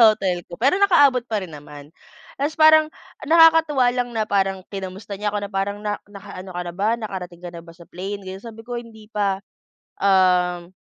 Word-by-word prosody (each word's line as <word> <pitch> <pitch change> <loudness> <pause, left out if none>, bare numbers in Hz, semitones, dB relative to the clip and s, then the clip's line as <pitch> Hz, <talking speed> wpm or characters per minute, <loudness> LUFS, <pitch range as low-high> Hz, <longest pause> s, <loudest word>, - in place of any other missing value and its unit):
hotel 180 -4 -2
ko. 175 - -9
Pero 275 +9 +3
nakaabot 285 -11 +5
pa 215 -2 -1
rin 180 - -8
naman. 145 0 -12 0.5
Tapos 295 +3 -1
parang 310 0 +7 0.4
nakakatuwa 320 -4 +5
lang 245 -1 -1
na 220 -2 -1
parang 195 -1 0
kinamusta 195 +1 -7
niya 210 +1 -2
ako, - - 0
na - - -16
parang, 200 +1 -2
"Na 210 -1 -2
naka-ano 195 -2 -10
ka 180 - -3
na - - -6
ba? 200 +3 0
Nakarating 180 -5 -6
ka 175 - -6
na 170 - -8
ba 165 - -13
sa 170 0 -16
plane? 195 +3 -6
Ganyan 190 +1 -8
"Sabi 225 -1 -10
ko, 245 - -5
"Hindi 220 -2 -12
pa, 200 -2 0 0.6
um, 180 -2 +2
200 Hz, 195 wpm, -22 LUFS, 185-240 Hz, 0.6 s, parang